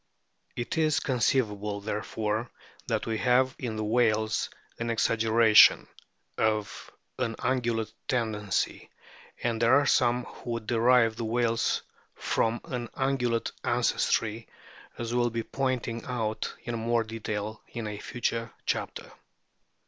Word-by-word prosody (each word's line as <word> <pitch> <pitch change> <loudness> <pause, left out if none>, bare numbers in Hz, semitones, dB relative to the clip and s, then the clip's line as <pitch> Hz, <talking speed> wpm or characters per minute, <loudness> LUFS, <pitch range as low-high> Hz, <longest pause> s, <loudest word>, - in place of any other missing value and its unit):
It 120 +6 -2
is 155 -1 +3
con 130 -3 -2
ceivable, 105 -4 0
therefore, 110 +2 -2 0.4
that - - -1
we 110 -1 -2
have 130 +4 +3
in 120 -4 -3
the 110 - -2
whales 110 -1 +1 0.3
an 115 0 -2
exaggeration 115 -1 +5 0.5
(of 110 -1 -1 0.3
an 115 -3 -1
Ungulate 120 -4 -1
tendency), 110 -5 -1 0.5
and 115 -1 0
there 115 +3 +6
are 145 0 +4
some 125 -1 +3
who 120 - -10
would 115 -2 -4
derive 115 0 +4
the 115 - -3
whales 115 0 +1 0.3
from 115 +1 0
an 125 -7 -4
Ungulate 125 -4 0
ancestry, 115 +1 +1 0.5
as 120 0 -4
will 120 0 +2
be 115 0 -3
pointed 125 -4 -2
out 110 -3 -2
in 120 - -4
more 115 0 +1
detail 110 -1 -4
in 115 -1 -5
a 105 -1 -5
future 115 0 -2
chapter. - - -3
115 Hz, 125 wpm, -28 LUFS, 110-120 Hz, 0.5 s, there